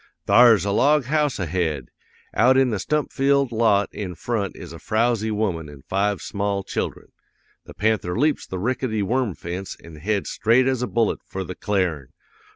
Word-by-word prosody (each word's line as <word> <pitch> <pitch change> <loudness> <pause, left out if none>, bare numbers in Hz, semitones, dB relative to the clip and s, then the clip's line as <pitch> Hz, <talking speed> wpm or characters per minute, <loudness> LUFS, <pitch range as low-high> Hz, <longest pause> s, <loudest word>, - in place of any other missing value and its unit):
"'Thar's 115 -6 +6
a 100 - 0
log 145 +7 +3
house 150 0 0
ahead; 80 -7 -2 0.4
out 130 +4 +4
in 135 -2 +3
the 105 - -1
stump 150 +9 -1
filled 140 -1 +2
lot 110 -3 +3
in 95 -4 -5
front 105 -1 -3
is 85 -2 -9
a 80 - -10
frowsy 110 0 0
woman 95 -8 -2
an' 70 -2 -13
five 100 +1 0
small 100 -1 -2
children. - - -4 0.6
The - - -12
panther 105 -4 0
leaps 150 +4 +1
the 95 - -5
rickety 110 0 -1
worm 115 -2 0
fence 90 +3 -6
an' 85 -2 -13
heads 100 +5 -2
straight 120 +4 +3
as 130 -2 0
a 125 - -1
bullet 115 -2 0
for 95 - -4
the 90 - -6
cl'arin! 90 -10 -1
105 Hz, 175 wpm, -23 LUFS, 95-125 Hz, 0.6 s, Thar's